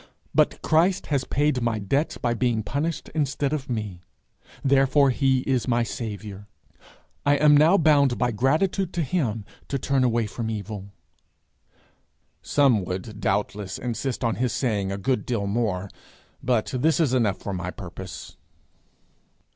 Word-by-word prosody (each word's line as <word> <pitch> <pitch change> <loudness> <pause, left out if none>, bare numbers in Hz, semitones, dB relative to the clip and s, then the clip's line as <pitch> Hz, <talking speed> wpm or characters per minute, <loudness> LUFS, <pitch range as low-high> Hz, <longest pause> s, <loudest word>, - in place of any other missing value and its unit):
But - - +2
Christ 175 +4 +2
has 135 -2 +1
paid 145 -2 +1
my 115 -1 0
debts, 135 +10 -1
by 120 - 0
being 120 -2 0
punished 150 +8 -3
instead 145 -1 -1
of 140 -3 -3
me. 105 -7 -4 0.6
Therefore 135 0 +4
he 130 0 +2
is 130 -2 0
my 120 -1 +2
Saviour. 105 -3 -6 0.8
I 145 0 +4
am 150 0 +5
now 160 +6 +6
bound 145 -6 +4
by 125 -1 +1
gratitude 160 - +1
to 170 - 0
him 125 - -1 0.2
to 140 - -1
turn 135 0 +1
away 120 -2 +2
from 110 +2 -4
evil.' 105 -2 -5 1.5
Some 130 -8 +3
would 95 +4 -5
doubtless 105 -2 -1
insist 125 +2 -3
on 115 -1 0
his 125 -2 0
saying 105 -7 -1
a 100 - -3
good 125 +6 0
deal 115 -5 -2
more, 100 -3 -1 0.5
but 120 -2 0
this 155 +7 +2
is 150 -6 +2
enough 110 -7 +2
for 100 - -5
my 90 -1 -3
purpose. 90 -2 -9
125 Hz, 145 wpm, -25 LUFS, 105-140 Hz, 1.5 s, now